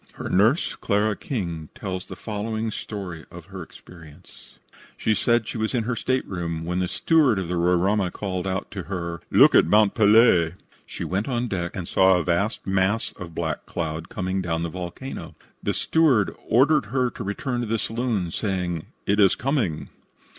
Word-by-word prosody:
Her - - -6
nurse, 110 - +3
Clara 105 +1 0
King, 85 - -4
tells 95 -2 -5
the 95 - -8
following 110 +2 -3
story 95 -7 -6
of - - -11
her - - -6
experience: 85 -1 -15 0.4
She 110 - +1
says 120 +1 +2
she 110 - -5
was 110 +3 -1
in 120 - +1
her 120 +2 -2
stateroom, 85 -11 -2
when 90 +2 -1
the 90 - 0
steward 145 - +3
of 95 -3 -2
the 90 - -2
Roraima 90 +3 +2
called 95 -2 -4
out 95 +1 -3
to 95 -3 -5
her: 85 -3 -4
"Look - - +6
at - - +6
Mont 105 +2 +4
Pelee." 105 -6 +5 0.3
She - - -6
went 95 +4 -2
on 125 -2 -1
deck 90 -5 -3
and 90 -3 -5
saw 95 -1 +4
a 90 - 0
vast 90 +7 0
mass 95 +3 +1
of 85 -2 -10
black 80 -3 -3
cloud 80 -1 -4
coming 95 0 -2
down 85 -2 -2
from - - -2
the 85 - -2
volcano. 90 +10 -7 0.3
The - - -1
steward 140 - +2
ordered 135 0 +4
her 125 +2 0
to - - -7
return 120 +5 -2
to 120 - -3
the 115 +1 0
saloon, 110 -6 -2
saying, 90 -5 -2 0.2
"It 100 +2 +1
is 100 -2 +5
coming." 120 - -1
95 Hz, 180 wpm, -24 LUFS, 90-115 Hz, 0.4 s, Look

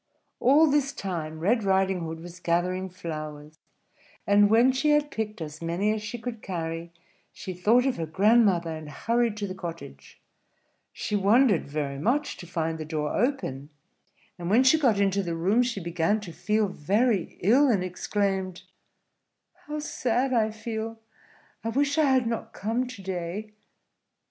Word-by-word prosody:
All 285 +5 +6
this 285 -1 +1
time 165 -7 -4
Red 215 +7 +2
Riding 190 -1 +2
Hood 165 -1 -5
was 175 +1 -10
gathering 180 +2 0
flowers; 155 -4 -7 0.7
and 205 0 +5
when 235 +4 +5
she 265 +4 0
had 295 0 +3
picked 215 -2 -4
as 155 0 -7
many 175 +6 0
as 215 - -3
she 215 +3 -5
could 230 -1 -6
carry, 165 -2 -4 0.4
she 185 - -7
thought 220 +8 +3
of 270 - 0
her 165 -1 -3
grandmother, 195 -2 +3
and 155 -1 -8
hurried 230 +7 0
to 205 - -2
the 185 - -5
cottage. 165 - -9 0.7
She 210 - -3
wondered 205 - +3
very 140 -1 -3
much 250 - 0
to 175 - -10
find 165 -1 -2
the - - -3
door 150 -1 -3
open; 205 - -1 0.7
and 175 0 -4
when 230 +6 +5
she 265 +5 +5
got 235 -9 +3
into 200 0 +2
the 170 -3 -3
room, 195 +8 +2
she 240 -4 -1
began 170 +4 0
to 175 -5 -8
feel 210 +6 +1
very 200 +4 0
ill, 250 +10 +5
and 200 -6 +2
exclaimed, 190 0 -2 1.0
"How 300 +1 -4
sad 260 -3 -1
I 220 -2 +3
feel! 220 +1 -5 0.6
I 225 - -1
wish 285 +5 +1
I 310 - +5
had 260 -3 +3
not 230 -1 -3
come 230 +5 -1
to 235 -6 -10
day." 190 +3 -5
200 Hz, 165 wpm, -26 LUFS, 170-235 Hz, 1.0 s, All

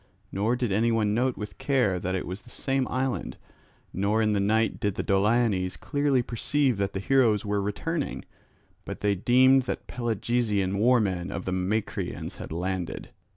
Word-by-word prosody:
Nor 110 +5 +1
did 120 -4 -1
anyone 110 0 +2
note 125 +3 +1
with 105 0 -7
care 120 -10 +1
that 95 +2 -2
it 95 - -3
was 95 +4 -6
the 120 - -17
same 135 +1 -1
island; 130 0 -2 0.6
nor 100 +3 +1
in 110 -1 +2
the 100 - +1
night 110 +3 +1
did 100 -2 -1
the - - -2
Doliones 100 -2 +1
clearly 145 -2 +1
perceive 130 +2 0
that 100 0 -1
the 95 - -2
heroes 115 -3 +2
were 100 0 0
returning; 145 +10 -3 0.6
but - - -7
they 105 -1 +2
deemed 130 +7 +5
that - - -3
Pelasgian 110 -4 -1
war 125 +3 +5
men 95 -4 -1
of - - -5
the 95 - -2
Macrians 95 +4 -2
had - - -8
landed. 90 +1 -4
105 Hz, 170 wpm, -27 LUFS, 100-125 Hz, 0.6 s, deemed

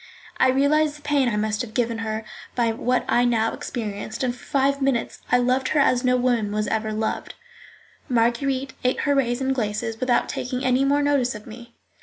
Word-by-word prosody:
I 260 - +4
realized 295 +3 +2
the 295 - -20
pain 285 -4 +2
I 220 - -1
must 210 0 -1
have 230 -3 -7
given 230 -2 0
her 220 0 -3 0.3
by 235 -2 +2
what 250 +2 0
I 245 - +3
now 230 -2 +1
experienced, 220 0 -5
and 245 -1 0
for - - -16
five 275 0 +1
minutes 265 -4 -1
I 245 - +6
loved 255 +1 +1
her 300 - +1
as 255 -2 +3
no 250 0 +3
woman 240 -4 +1
was 210 0 -1
ever 220 0 -1
loved. 220 +1 -3 0.7
Marguerite 260 +3 +1
ate 250 0 +1
her 285 - +2
raisins 265 0 +1
glaces 225 -1 -2
without 255 -2 +2
taking 250 +1 -3
any 255 +1 +3
more 285 +1 +2
notice 275 -5 +1
of 210 - -9
me. 235 +1 -12
245 Hz, 195 wpm, -23 LUFS, 225-265 Hz, 0.7 s, I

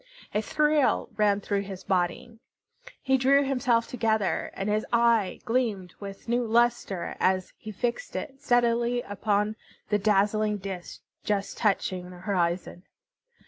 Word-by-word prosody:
A 210 - +1
thrill 300 +4 +2
ran 205 -1 +2
through 200 0 -1
his 190 -1 -8
body. 190 +5 -1 0.6
He 265 -1 +3
drew 275 +2 +4
himself 250 -4 +1
together, 220 -4 0
and 195 - -3
his 210 +1 +1
eye 235 -4 +2
gleamed 220 -7 -1
with 195 +1 -9
new 240 +1 +1
lustre 230 -6 +1
as 185 0 +1
he 215 - -9
fixed 240 - -3
it 270 -1 -5
steadily 240 -2 +2
upon 205 +1 -1 0.3
the 210 - +2
dazzling 210 +1 +2
disk 190 -2 -7 0.2
just 205 -1 -1
touching 185 -4 0
the 180 - -11
horizon. 175 -2 -1
215 Hz, 135 wpm, -27 LUFS, 195-240 Hz, 0.6 s, drew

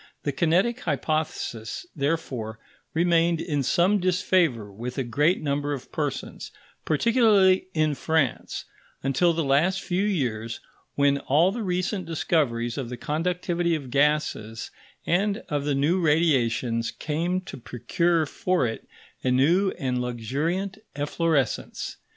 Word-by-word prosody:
The 145 - 0
kinetic 175 - +2
hypothesis, 155 -7 -2
therefore, 140 -7 -2 0.4
remained 170 0 +3
in 145 -4 -1
some 180 +9 +3
disfavour 170 - +1
with 120 +6 -6
a 135 - 0
great 150 - +1
number 145 0 -1
of 135 - -7
persons, - - -4 0.4
particularly 195 - +4
in 155 -1 +2
France, 145 -2 -1 0.4
until 135 +6 +3
the 165 0 -1
last 160 +8 +2
few 185 +1 0
years, 120 - -1 0.4
when 140 0 +3
all 160 +8 +3
the 230 +3 -4
recent 185 -1 -1
discoveries 140 -7 0
of 125 -3 -4
the 125 - -5
conductivity 170 +2 -1
of 135 -5 -6
gases 140 -6 0 0.3
and 200 +4 +1
of 145 -3 -1
the 145 -1 +1
new 160 +7 +2
radiations 130 -8 +2
came 170 +4 -2
to 185 - -9
procure 165 - 0
for 180 +1 0
it 115 -1 -4 0.4
a 130 - +1
new 165 +10 +3
and 125 -2 -1
luxuriant 145 - -2 0.2
efflorescence. 145 0 -1
155 Hz, 125 wpm, -25 LUFS, 130-175 Hz, 0.4 s, particularly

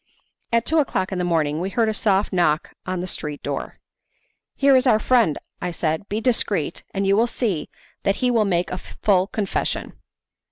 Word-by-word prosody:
At 230 0 +2
two 320 +1 +3
o'clock 190 -10 0
in 185 - -2
the - - 0
morning 160 -3 +1
we 190 - -2
heard 230 +2 +1
a 220 - +1
soft 205 -2 +1
knock 160 -4 +1
on 185 -1 -2
the - - -3
street 150 -5 -5
door. - - -4 0.8
"Here 275 -1 +5
is 260 +1 +4
our 220 - +6
friend," 225 -7 +3 0.2
I 180 - -1
said, 165 +2 -2
"be 210 - -1
discreet, 215 - 0
and 195 0 -1
you 195 0 +4
will 230 +3 +3
see 210 -10 -2 0.3
that 195 0 +1
he 250 +2 +1
will 230 -3 +3
make 180 -3 0
a 180 - -3
full 190 -2 +1
confession." 205 -1 -2
195 Hz, 195 wpm, -22 LUFS, 175-225 Hz, 0.8 s, our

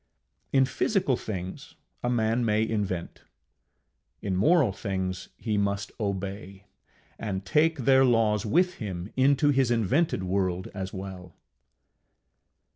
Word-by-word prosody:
In 135 -1 +4
physical 185 - +1
things 95 -5 -6 0.3
a 120 - -1
man 115 0 +1
may 110 0 +2
invent; 100 -6 -3 1.0
in 95 -2 -2
moral 140 - +4
things 95 -3 -3
he 105 -3 -1
must 100 0 -1
obey 100 -1 -4 0.5
and 100 -3 -4
take 160 +1 +3
their 135 0 +4
laws 115 -4 +3
with 180 - +2
him 95 -2 -5
into 140 +2 +4
his 135 -3 +3
invented 120 - +1
world 95 -1 -1
as 95 -1 -5
well. 95 -2 -8
105 Hz, 120 wpm, -27 LUFS, 95-130 Hz, 1.0 s, In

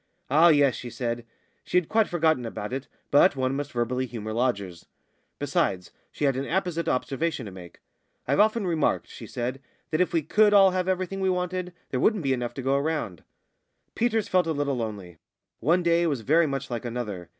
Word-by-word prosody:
"Ah, 160 +4 +6
yes," 145 -5 +5
she 120 - -7
said. 120 -2 -4 0.4
She - - 0
had 180 -3 +2
quite 220 -1 +2
forgotten 160 -6 +1
about 110 -1 -5
it, 135 +1 -4 0.2
but 145 +4 +5
one 130 0 0
must 145 0 -4
verbally 125 +2 -1
humour 110 -2 -6
lodgers. 100 -8 -2 0.5
Besides, 90 -2 -1 0.2
she 150 - -2
had 135 -2 +2
an 135 +1 -3
apposite 175 -1 -1
observation 140 +1 -1
to 100 - -7
make. 90 -2 -12 0.5
"I've 140 - +1
often 215 0 +3
remarked," 165 -4 0
she - - -10
said, 125 +2 -4 0.3
"that 155 +2 +1
if 180 - +1
we 165 -2 +1
could 210 +6 +4
all 195 -1 +7
have 185 0 -1
everything 185 +1 -1
we 190 - +2
wanted, 180 0 -2 0.2
there 130 - -1
wouldn't 210 - +2
be 135 -1 +2
enough 120 -2 -3
to 135 - -5
go 135 +1 +2
round." 145 - -3 0.7
Peters 225 -2 0
felt 180 -2 +2
a 160 - 0
little 140 -2 -1
lonely. 100 -7 -6 0.4
One 170 +8 +2
day 170 0 +3
was 140 -7 -1
very 155 +8 +3
much 135 -2 -4
like 120 0 -3
another. 110 -8 -5
140 Hz, 195 wpm, -26 LUFS, 120-175 Hz, 0.7 s, all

